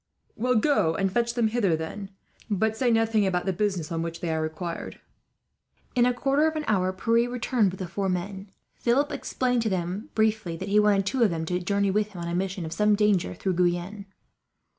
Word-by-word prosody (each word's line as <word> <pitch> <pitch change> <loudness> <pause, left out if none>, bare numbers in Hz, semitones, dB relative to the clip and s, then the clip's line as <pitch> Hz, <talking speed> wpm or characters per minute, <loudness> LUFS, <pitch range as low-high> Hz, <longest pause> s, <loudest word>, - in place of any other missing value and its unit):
"Well, 250 +3 +1
go 215 - +2
and 195 +1 0
fetch 235 +2 0
them 235 -3 +2
hither, 210 -7 +1
then. 175 +5 -6 0.6
Say 245 +3 +1
nothing 225 -3 +2
about 180 -2 -1
the 190 - 0
business 185 -5 -1
on 165 -1 -1
which 165 0 -4
they 165 -2 -2
are 160 - -1
required." 160 +2 -5 0.9
In 245 -1 +4
a 250 - +2
quarter 275 +4 +2
of 315 - -2
an 310 - -2
hour 185 -3 +1
Pierre 230 +5 +1
returned, 245 -3 +1
with 185 - -8
the 185 - -4
four 195 +3 -2
men. 190 +2 -4 0.2
Philip 270 +5 +1
explained 250 -3 -1
to 225 - 0
them, 190 - -3
briefly, 220 -6 +1
that 190 +4 -5
he 210 +1 +4
wanted 205 -2 +3
two 255 +5 -1
of 225 - +5
them 165 -2 -3
to 180 +2 -1
journey 200 +2 0
with 210 +1 0
him, 175 - -7
on - - -4
a 170 - -3
mission 185 0 -2
of 160 - -5
some 210 +2 +3
danger, 200 - +1
through 190 - -1
Guyenne. 180 +3 -1
200 Hz, 210 wpm, -26 LUFS, 180-225 Hz, 0.9 s, of